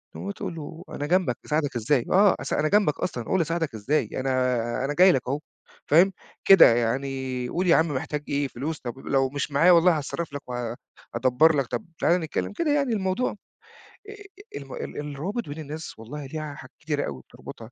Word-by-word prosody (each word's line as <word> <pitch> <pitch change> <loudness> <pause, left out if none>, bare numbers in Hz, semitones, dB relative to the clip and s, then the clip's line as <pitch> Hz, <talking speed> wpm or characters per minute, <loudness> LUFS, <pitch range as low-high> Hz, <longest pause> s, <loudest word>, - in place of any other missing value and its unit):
اللي - - -7
هو 200 - -2
تقول 180 -3 -6
له 160 +2 -8
أنا 145 - -4
جنبك 180 -7 +1
أساعدك 150 -3 -1
إزاي؟ 120 +2 +1
آه. 195 +1 +5
أس 135 - -4
أنا 155 +1 +1
جنبك 205 -8 +2
أصلًا 125 -9 -3
قُل 190 - +1
لي - - +2
أساعدك 160 -4 -2
إزاي؟ 130 +9 0
أنا 125 -2 0
أنا 145 - -1
جاي 185 +4 +6
لك 130 - +1
أهو 140 +3 -1 0.5
فاهم؟ 180 +5 +5 0.3
كده 185 -11 +8
يعني 130 +1 -2
قل 180 +1 -1
يا 165 - +6
عم 165 +1 +3
محتاج 145 +1 -3
إيه 145 0 0
فلوس؟ 145 +5 -5
طب 120 -2 -5
ب - - -24
لو 135 -1 +2
مش 145 +1 -3
معايا 165 +6 +5
والله 170 -1 +5
هاتصرّف 150 +1 -5
لك 145 - -5
وهادبّر 125 +4 0
لك 135 -3 0
طب 120 -2 -4
تعالَ 175 +2 +3
نتكلّم 160 +5 -3
كده 300 +6 0
يعني 280 -5 +1
الموضوع 190 +4 0 0.8
أ - - -7
أ 410 +1 -12
الم - - -9
ال 470 - -6
الروابط 150 - -4
بين 150 +2 -6
الناس 155 -3 -7
والله 140 +6 -7
ليها 155 +1 -6
حاجات 130 - -13
كتيرة 150 -1 -2
أوي 65 -2 -6
بتربطها. 115 - -12
150 Hz, 205 wpm, -25 LUFS, 130-175 Hz, 0.8 s, كده